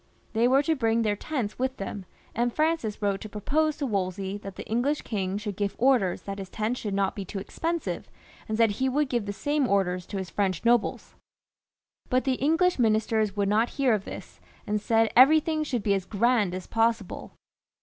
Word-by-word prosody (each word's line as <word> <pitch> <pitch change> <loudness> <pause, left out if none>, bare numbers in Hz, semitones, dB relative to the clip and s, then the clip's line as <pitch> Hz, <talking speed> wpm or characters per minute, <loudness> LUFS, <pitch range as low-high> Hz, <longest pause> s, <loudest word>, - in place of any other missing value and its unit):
They 230 +2 +3
were 270 +3 +4
to 320 - +2
bring 230 -3 +1
their 210 -1 +1
tents 240 -2 -4
with 260 +1 -1
them, 195 -1 -6 0.3
and 240 +1 0
Francis 305 -9 -1
wrote 200 -1 0
to 215 - -7
propose 295 +9 0
to 285 - -2
Wolsey 195 -3 -2
that 195 -2 -9
the - - -7
English 255 +7 0
king 195 -3 -2
should 205 -1 -4
give 200 0 -2
orders 240 -8 +2
that 200 0 -6
his 190 -1 -7
tents 220 +5 -2
should 205 -3 -3
not 195 -1 0
be 200 - -4
too 195 +2 -7
expensive, 330 - -3 0.4
and 215 - -1
said 225 -2 +4
he 260 +6 0
would 290 +1 0
give 235 -5 -1
the - - -1
same 290 +6 0
orders 185 -4 0
to 200 - -5
his 190 -3 -5
French 190 -1 -1
nobles. 235 -1 +1 1.0
But 255 0 +2
the 265 - +1
English 325 +3 +2
ministers 220 -2 +2
would 200 -1 +1
not 220 +3 +2
hear 265 -4 +3
of 205 -2 -1
this, - - -9 0.2
and 210 0 -1
said 225 0 +2
everything 310 +4 +5
should 250 -7 -2
be 200 - +2
as 195 -2 -1
grand 215 -3 +1
as 185 - -6
possible. 225 -3 -1
220 Hz, 200 wpm, -27 LUFS, 200-260 Hz, 1.0 s, everything